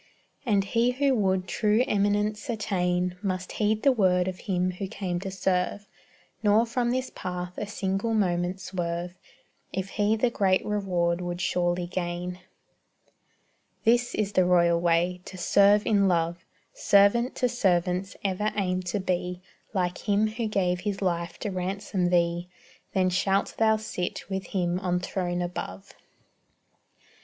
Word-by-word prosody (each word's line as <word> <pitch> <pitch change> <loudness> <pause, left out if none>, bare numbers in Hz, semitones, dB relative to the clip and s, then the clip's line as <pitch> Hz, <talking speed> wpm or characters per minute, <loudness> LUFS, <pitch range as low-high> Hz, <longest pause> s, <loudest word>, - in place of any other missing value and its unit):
And 200 -3 +3
he 235 +5 +1
who 275 +1 +2
would 190 -5 +1
true 215 +5 +2
eminence 205 +1 0
attain 180 -5 0
Must 185 -3 -3
heed 215 0 0
the 275 - +6
word 185 -6 +2
of 185 -1 -4
Him 185 -2 0
who 185 +2 -5
came 185 -2 -3
to 195 +1 -5
serve, 190 +1 -1 0.5
Nor 215 +2 +4
from 240 +1 -1
this 255 +1 -1
path 180 0 -5
a 210 - -4
single 200 +2 -1
moment 180 -2 0
swerve, 175 -1 -3 0.6
If 190 0 -3
he 210 +1 +1
the 235 +2 +1
great 190 -4 +2
reward 180 -4 0
would 175 0 -4
surely 175 0 0
gain. 175 0 -4 1.4
This 240 +1 +3
is 205 -2 -1
the 185 - +3
royal 170 -1 +3
way 175 +1 +1
to 185 - -9
serve 200 +3 +4
in 200 -2 +3
love 170 -1 0 0.3
Servant 205 +5 +3
to 250 - +1
servants 185 -5 0
ever 200 +2 0
aim 185 -2 0
to 180 +3 -2
be 180 -1 -2 0.3
Like 180 -3 -1
Him 205 +1 +4
who 225 +1 -3
gave 180 -4 0
His 200 +1 -3
life 170 -2 -1
to 210 - -2
ransom 185 0 -2
thee; 175 0 +1 0.5
Then 185 -1 +3
shalt 195 +2 +1
thou 220 -1 +4
sit 200 -3 -5
with 190 -1 -3
Him 180 -2 -1
on 180 -2 0
throne 180 -1 -2
above. 95 - -6
185 Hz, 150 wpm, -27 LUFS, 180-210 Hz, 1.4 s, the